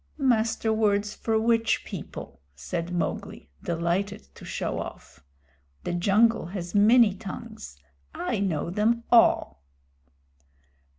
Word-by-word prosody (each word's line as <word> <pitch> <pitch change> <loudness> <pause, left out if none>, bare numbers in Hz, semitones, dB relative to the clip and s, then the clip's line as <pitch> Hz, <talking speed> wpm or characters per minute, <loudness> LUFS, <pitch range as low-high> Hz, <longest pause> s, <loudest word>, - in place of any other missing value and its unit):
"Master 225 -4 +1
Words 210 -1 +1
for 220 -1 0
which 230 0 +1
people?" - - -8
said 120 - -4
Mowgli, 170 - -4
delighted 170 - -2
to - - -14
show - - -3
off. - - -9 0.6
"The - - -3
jungle 205 +4 +3
has 175 -1 -6
many 215 +1 +6
tongues. 210 - -9 0.3
I 205 - -3
know 170 -4 -1
them 225 +4 +1
all." 230 - +4
205 Hz, 110 wpm, -26 LUFS, 175-225 Hz, 0.6 s, many